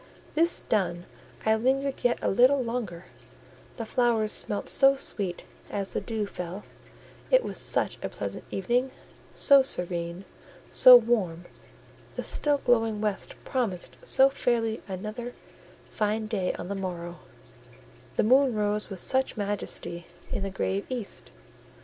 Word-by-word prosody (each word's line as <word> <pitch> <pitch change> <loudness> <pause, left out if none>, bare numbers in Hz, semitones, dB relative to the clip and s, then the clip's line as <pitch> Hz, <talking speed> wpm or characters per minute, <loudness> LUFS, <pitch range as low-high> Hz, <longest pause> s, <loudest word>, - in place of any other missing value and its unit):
This 335 +2 +2
done, 175 -4 -1 0.4
I 220 - +4
lingered 265 +4 0
yet 245 0 +2
a - - +1
little 255 +6 +4
longer: 225 -8 -4 0.7
the 230 - -4
flowers 230 -3 +1
smelt 205 - -1
so 275 0 +7
sweet 195 -9 -3 0.3
as 200 -1 -3
the - - -1
dew 220 -3 -3
fell; 180 0 -7 0.7
it - - +5
was - - -4
such - - 0
a - - -2
pleasant - - -6
evening, 240 +7 0 0.5
so 280 -2 +6
serene, 175 -5 -2 0.5
so 255 -1 +9
warm; 205 -8 -1 0.7
the - - -4
still 290 -1 +1
glowing 225 -5 +1
west 210 -2 -2
promised 225 -10 -2
so 270 0 +5
fairly 235 -5 -1
another 215 +6 -6 0.6
fine 215 +1 -1
day 205 -4 -1
on - - -7
the 200 - -3
morrow; 175 -3 -5 1.0
the - - +2
moon 260 +2 +4
rose 210 0 -1
with 195 -3 -7
such 265 +3 +1
majesty 200 -4 -4 0.2
in - - -2
the 195 - -2
grave 190 +1 -2
east. 245 -6 -6
215 Hz, 135 wpm, -27 LUFS, 190-250 Hz, 1.0 s, so